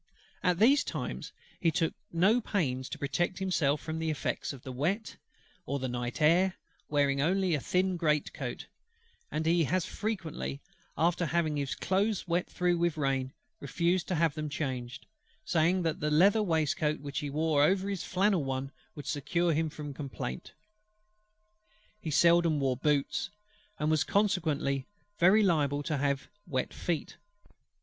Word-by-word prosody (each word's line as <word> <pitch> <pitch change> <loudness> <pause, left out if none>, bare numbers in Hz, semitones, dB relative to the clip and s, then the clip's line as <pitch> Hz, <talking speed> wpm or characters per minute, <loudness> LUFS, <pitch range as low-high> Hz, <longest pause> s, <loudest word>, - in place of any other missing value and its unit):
At 180 -2 +2
these 265 +9 +5
times - - -5 0.3
he 170 - +3
took 165 +1 0 0.2
no 195 +8 +3
pains 130 - -1
to - - -5
protect 145 +6 -1
himself 155 -7 +1
from 160 0 -4
the 160 0 -1
effects 155 - -2
of 135 -2 -11
wet, 155 - -2 0.5
or 140 - -1
the 130 -1 -3
night 120 +4 -3
air; 175 +4 +4 0.3
wearing 140 -2 +2
only 185 +3 +2
a 150 - +1
thin 185 +4 0
great 150 -3 +1
coat: - - -5 0.6
and 155 +1 -2
he 165 0 +3
has 180 +4 0
frequently, 185 -10 -4 0.4
after 170 +1 +2
having 160 -2 +1
his 140 -2 -2
clothes 200 +1 0
wet 175 +1 0
through 175 -1 +1
with 170 -2 +1
rain, 135 -2 0 0.3
refused 170 +5 0
to 185 - -1
have 165 -2 +2
them 155 -1 -4
changed, 130 -4 -4 0.4
saying 175 +1 +2
that 165 -2 -1
the 150 - 0
leather 195 +8 +5
waistcoat 155 -4 +1
which 140 0 -4
he 145 - -4
wore 155 0 +1
over 190 +6 +3
his 195 -3 -3
flannel 190 -3 +2
one 135 0 -3 0.2
would 145 - -8
secure 170 +4 0
him 160 +1 0
from 145 -1 -7
complaint. 135 - -6 1.5
He 165 - -5
seldom 170 0 +4
wore 135 -2 +1
boots, 145 +1 0 0.5
and 155 -4 0
was 155 -2 +3
consequently 160 -10 0 0.3
very 190 +5 +6
liable 145 -6 +2
to 155 0 -1
have 140 -1 0 0.3
his 130 -2 0
feet 170 -4 -3
wet. 205 0 -34
160 Hz, 155 wpm, -30 LUFS, 145-180 Hz, 1.5 s, very